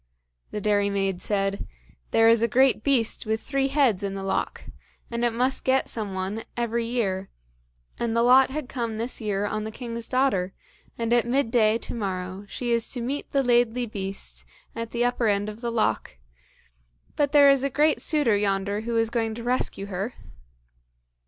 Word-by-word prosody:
The 210 Hz, -, -4 dB
dairymaid 200 Hz, -2 st, 0 dB
said, 195 Hz, 0 st, -1 dB, 0.4 s
"There 225 Hz, 0 st, +4 dB
is 230 Hz, 0 st, +5 dB
a 230 Hz, -, +3 dB
great 255 Hz, 0 st, +3 dB
beast 235 Hz, -5 st, +1 dB
with 220 Hz, 0 st, 0 dB
three 275 Hz, +2 st, -1 dB
heads 270 Hz, -8 st, +2 dB
in 195 Hz, -1 st, -3 dB
the 195 Hz, -, -5 dB
loch, 195 Hz, -, -2 dB, 0.5 s
and 235 Hz, 0 st, -2 dB
it 240 Hz, -, +4 dB
must 250 Hz, +3 st, 0 dB
get 260 Hz, 0 st, +2 dB
some 210 Hz, -4 st, -3 dB
one 195 Hz, +4 st, -3 dB
every 235 Hz, -1 st, -1 dB
year, 195 Hz, -6 st, -1 dB, 0.7 s
and 230 Hz, -1 st, -1 dB
the 230 Hz, -, +3 dB
lot 255 Hz, +2 st, +6 dB
had 285 Hz, 0 st, -4 dB
come 235 Hz, -5 st, -3 dB
this 235 Hz, +2 st, -3 dB
year 205 Hz, -2 st, -1 dB
on 215 Hz, +1 st, -2 dB
the 215 Hz, -, -4 dB
king's 230 Hz, 0 st, -6 dB
daughter, 250 Hz, -8 st, +1 dB, 0.4 s
and 230 Hz, 0 st, 0 dB
at 240 Hz, -1 st, +3 dB
midday 235 Hz, -4 st, +2 dB
to -, -, -7 dB
morrow 190 Hz, -2 st, -4 dB
she 240 Hz, +3 st, -3 dB
is 230 Hz, -1 st, +1 dB
to 250 Hz, -, -4 dB
meet 265 Hz, +5 st, -3 dB
the 275 Hz, -1 st, +1 dB
Laidly 245 Hz, 0 st, +2 dB
Beast 195 Hz, -, -5 dB, 0.3 s
at 230 Hz, 0 st, -4 dB
the 240 Hz, +1 st, 0 dB
upper 245 Hz, -1 st, +1 dB
end 205 Hz, 0 st, +1 dB
of 215 Hz, +2 st, -9 dB
the 235 Hz, -1 st, -2 dB
loch, 225 Hz, -, -1 dB, 1.0 s
but 285 Hz, -2 st, +1 dB
there 285 Hz, -1 st, +7 dB
is 275 Hz, -1 st, +2 dB
a 275 Hz, -, +1 dB
great 295 Hz, +3 st, +2 dB
suitor 290 Hz, -9 st, +3 dB
yonder 200 Hz, 0 st, 0 dB
who 230 Hz, +1 st, -2 dB
is 225 Hz, 0 st, +1 dB
going 225 Hz, -2 st, -1 dB
to 235 Hz, -, -7 dB
rescue 245 Hz, -5 st, -1 dB
her." 200 Hz, +4 st, -4 dB
230 Hz, 185 wpm, -25 LUFS, 205-245 Hz, 1.0 s, there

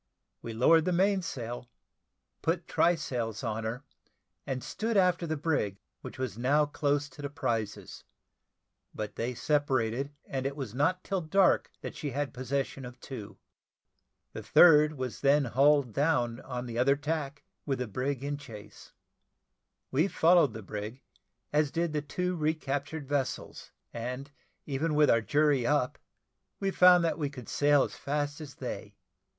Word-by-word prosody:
We 115 Hz, -, -6 dB
lowered 160 Hz, +8 st, +5 dB
the 180 Hz, -, +1 dB
mainsail, 165 Hz, -, -1 dB, 0.7 s
put 165 Hz, +1 st, -1 dB
try 175 Hz, +1 st, +3 dB
sails 120 Hz, -7 st, -4 dB
on 110 Hz, -1 st, -2 dB
her, 120 Hz, +5 st, -4 dB, 0.6 s
and 130 Hz, -2 st, -3 dB
stood 225 Hz, 0 st, -2 dB
after 180 Hz, -2 st, +3 dB
the 155 Hz, 0 st, -1 dB
brig, 140 Hz, -11 st, -1 dB, 0.2 s
which -, -, -9 dB
was 125 Hz, -5 st, -4 dB
now 145 Hz, +5 st, +3 dB
close 145 Hz, 0 st, 0 dB
to 145 Hz, -, -12 dB
the 140 Hz, -, -4 dB
prizes: 115 Hz, -7 st, -3 dB, 0.9 s
but 105 Hz, -1 st, -5 dB
they 120 Hz, +2 st, -3 dB
separated, 135 Hz, -2 st, 0 dB
and 135 Hz, 0 st, -2 dB
it 140 Hz, -, -5 dB
was 130 Hz, -7 st, -5 dB
not 165 Hz, +8 st, +1 dB
till 195 Hz, -2 st, -1 dB
dark 185 Hz, +4 st, +3 dB
that -, -, -6 dB
she 150 Hz, -, -4 dB
had 140 Hz, +1 st, -3 dB
possession 135 Hz, +1 st, -3 dB
of 125 Hz, 0 st, -9 dB
two. 120 Hz, -6 st, -8 dB, 1.0 s
The -, -, -6 dB
third 150 Hz, -3 st, +6 dB
was 130 Hz, -4 st, -5 dB
then 140 Hz, +1 st, +4 dB
hull 140 Hz, +4 st, +4 dB
down 125 Hz, -1 st, 0 dB
on 125 Hz, -2 st, -5 dB
the 120 Hz, -1 st, -4 dB
other 140 Hz, +3 st, +4 dB
tack, 145 Hz, -1 st, -3 dB, 0.2 s
with 135 Hz, -2 st, 0 dB
the 125 Hz, -, -2 dB
brig 130 Hz, +4 st, -3 dB
in 145 Hz, 0 st, -2 dB
chase. 110 Hz, -8 st, -12 dB, 1.0 s
We 155 Hz, +8 st, +3 dB
followed 170 Hz, -, +4 dB
the 110 Hz, -1 st, -7 dB
brig, 105 Hz, +6 st, -6 dB, 0.5 s
as 150 Hz, -1 st, +3 dB
did 165 Hz, +1 st, -1 dB
the 150 Hz, -, 0 dB
two 180 Hz, +5 st, -2 dB
recaptured 150 Hz, -2 st, -2 dB
vessels, 140 Hz, -2 st, -3 dB, 0.2 s
and 125 Hz, +4 st, -5 dB, 0.3 s
even 150 Hz, +2 st, -1 dB
with 150 Hz, 0 st, +5 dB
our 115 Hz, -, +4 dB
jury 145 Hz, 0 st, +2 dB
up, 145 Hz, -3 st, +1 dB, 0.6 s
we 195 Hz, -1 st, 0 dB
found 180 Hz, -2 st, +7 dB
that 165 Hz, -, -1 dB
we 145 Hz, -2 st, -1 dB
could 130 Hz, -5 st, -10 dB
sail 145 Hz, -1 st, +4 dB
as -, -, -5 dB
fast 145 Hz, +1 st, -2 dB
as 145 Hz, -3 st, -9 dB
they. 110 Hz, -5 st, -6 dB
140 Hz, 155 wpm, -30 LUFS, 125-155 Hz, 1.0 s, found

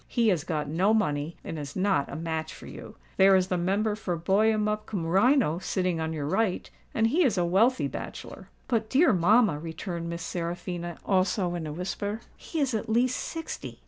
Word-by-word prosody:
He 235 Hz, -3 st, +2 dB
has 175 Hz, -7 st, +1 dB
got 150 Hz, -4 st, -2 dB
no 185 Hz, +9 st, +2 dB
money, 150 Hz, -5 st, -1 dB
and 160 Hz, -, -5 dB
is 145 Hz, -1 st, -7 dB
not 190 Hz, -7 st, +1 dB
a -, -, -5 dB
match 160 Hz, -1 st, -3 dB
for -, -, -12 dB
you. -, -, -10 dB, 0.2 s
There 195 Hz, 0 st, +7 dB
is 185 Hz, 0 st, +2 dB
the 180 Hz, -, +1 dB
Member 200 Hz, +5 st, +1 dB
for 185 Hz, -5 st, -3 dB
Buyemup 210 Hz, +4 st, +1 dB
cum 190 Hz, -6 st, -3 dB
Rhino 195 Hz, -, +3 dB
sitting 180 Hz, -3 st, -1 dB
on 160 Hz, 0 st, -2 dB
your 150 Hz, -3 st, -3 dB
right, 185 Hz, +5 st, 0 dB, 0.2 s
and 225 Hz, -, +1 dB
he 305 Hz, +11 st, +3 dB
is 245 Hz, -9 st, +2 dB
a 175 Hz, -, +2 dB
wealthy 220 Hz, +9 st, +3 dB
bachelor." -, -, -8 dB, 0.2 s
"But, 225 Hz, -3 st, 0 dB
dear 295 Hz, 0 st, +4 dB
mamma," 190 Hz, -2 st, +4 dB
returned 170 Hz, +1 st, -5 dB
Miss 170 Hz, 0 st, -5 dB
Seraphina, 175 Hz, 0 st, -4 dB
also 185 Hz, -1 st, +1 dB
in 170 Hz, -3 st, -4 dB
a -, -, -4 dB
whisper, 200 Hz, +6 st, -4 dB
"he 325 Hz, -, -6 dB
is 275 Hz, -4 st, +1 dB
at 220 Hz, +1 st, -2 dB
least 245 Hz, +3 st, +2 dB
sixty." 325 Hz, -1 st, -6 dB
185 Hz, 195 wpm, -27 LUFS, 165-220 Hz, 0.2 s, There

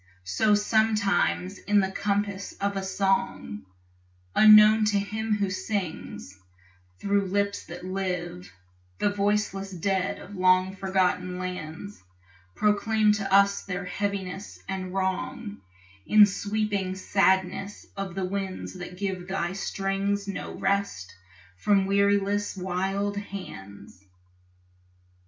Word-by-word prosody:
So 210 Hz, -, +3 dB
sometimes 205 Hz, -3 st, +1 dB
in 205 Hz, 0 st, +2 dB
the 190 Hz, -1 st, 0 dB
compass 200 Hz, 0 st, -2 dB
of 200 Hz, 0 st, -2 dB
a 195 Hz, -, -1 dB
song, 190 Hz, -, -1 dB, 0.7 s
Unknown 215 Hz, 0 st, +8 dB
to 210 Hz, -1 st, +2 dB
him 215 Hz, +2 st, -1 dB
who 200 Hz, -2 st, -1 dB
sings, 180 Hz, -, -4 dB, 0.6 s
thro' 200 Hz, -, +1 dB
lips 200 Hz, +1 st, -1 dB
that 175 Hz, +2 st, -8 dB
live, 180 Hz, -, -4 dB, 0.5 s
The 205 Hz, -, +1 dB
voiceless 205 Hz, -1 st, 0 dB
dead 190 Hz, +1 st, -1 dB
of 205 Hz, -, -11 dB
long 185 Hz, +1 st, +3 dB
forgotten 185 Hz, -1 st, 0 dB
lands 180 Hz, +1 st, -6 dB, 0.5 s
Proclaim 210 Hz, +1 st, +3 dB
to 205 Hz, -2 st, -2 dB
us 200 Hz, 0 st, +5 dB
their 180 Hz, -1 st, -5 dB
heaviness 195 Hz, 0 st, -4 dB
and 185 Hz, -1 st, -4 dB
wrong 205 Hz, +4 st, -3 dB, 0.5 s
In 215 Hz, -1 st, +8 dB
sweeping 205 Hz, -2 st, -2 dB
sadness 190 Hz, +1 st, +1 dB
of 195 Hz, -3 st, -5 dB
the 190 Hz, -1 st, -1 dB
winds 190 Hz, 0 st, -4 dB
that 180 Hz, 0 st, -8 dB
give 185 Hz, -2 st, -3 dB
Thy 190 Hz, -2 st, -2 dB
strings 195 Hz, +1 st, -2 dB
no 195 Hz, -, -5 dB
rest 195 Hz, -, -1 dB, 0.4 s
from 195 Hz, -, +3 dB
weariless 200 Hz, +1 st, +1 dB
wild 195 Hz, +2 st, -1 dB
hands. 100 Hz, -, -9 dB
195 Hz, 110 wpm, -26 LUFS, 185-205 Hz, 0.7 s, Unknown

